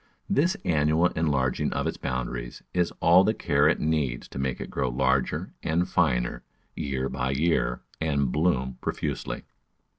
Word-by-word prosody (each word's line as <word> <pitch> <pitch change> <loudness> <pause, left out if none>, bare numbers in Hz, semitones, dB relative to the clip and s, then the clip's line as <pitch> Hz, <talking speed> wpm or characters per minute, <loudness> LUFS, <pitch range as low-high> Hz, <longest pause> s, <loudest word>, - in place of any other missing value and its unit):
This 170 +7 +2
annual 80 +2 +3
enlarging 70 -6 0
of - - -1
its - - -2
boundaries 60 -1 -4
is 90 -1 +2
all 85 +3 +7
the 110 +3 +2
care 70 -6 +3
it 80 - +1
needs 75 -6 -1
to - - -7
make 65 -2 -1
it - - -6
grow 65 - 0
larger 65 +1 0
and 85 +3 +1
finer, - - +1 0.3
year 65 -2 -2
by 65 -1 -2
year, 70 -3 +1 0.2
and 70 -5 +1
bloom 65 -5 0
profusely. - - -3
70 Hz, 150 wpm, -27 LUFS, 65-80 Hz, 0.3 s, all